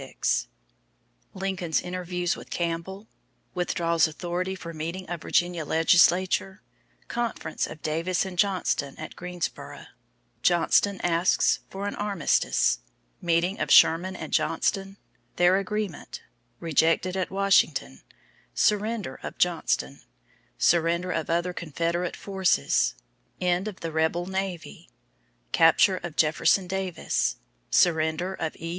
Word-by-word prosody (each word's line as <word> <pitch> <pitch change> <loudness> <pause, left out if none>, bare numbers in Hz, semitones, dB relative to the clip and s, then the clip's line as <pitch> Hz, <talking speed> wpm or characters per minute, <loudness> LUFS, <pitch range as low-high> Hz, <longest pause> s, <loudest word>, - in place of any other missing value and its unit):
XXXVI - - -1 0.9
Lincoln's 190 -3 -1
Interviews 180 -1 -2
with - - -12
Campbell 175 +5 -4 0.5
Withdraws 170 -2 +1
Authority 175 +4 -3
for 170 -2 -8
Meeting 170 +4 -5
of 175 -2 -5
Virginia 175 -1 0
Legislature 180 +4 +3 0.4
Conference 235 -9 -3
of 155 - -11
Davis 165 +4 0
and 190 -1 -6
Johnston 180 -7 0
at 155 - -8
Greensboro 180 -1 -6 0.6
Johnston 180 +3 +3
Asks 175 +1 +2
for 195 +1 -6
an 205 - -2
Armistice 170 - +1 0.4
Meeting 175 +4 +1
of - - -2
Sherman 180 +3 +5
and - - -7
Johnston 195 -1 0 0.4
Their 175 +2 +4
Agreement 200 -3 -4 0.4
Rejected 165 +3 +1
at 190 -1 -1
Washington 185 - +1 0.5
Surrender 210 -6 0
of - - -7
Johnston 65 +2 0 0.6
Surrender 170 - +2
of 160 -3 -2
other 175 +2 0
Confederate 170 +2 -2
Forces 190 - +1 0.4
End 180 +2 0
of 205 -3 -7
the 165 - -4
Rebel 160 +2 0
Navy 190 - -5 0.6
Capture 165 +4 +5
of 170 -3 -7
Jefferson 160 +5 +3
Davis 180 - -1 0.3
Surrender 160 +2 +2
of 160 -4 -4
E. 165 - -7
175 Hz, 115 wpm, -26 LUFS, 165-190 Hz, 0.9 s, Sherman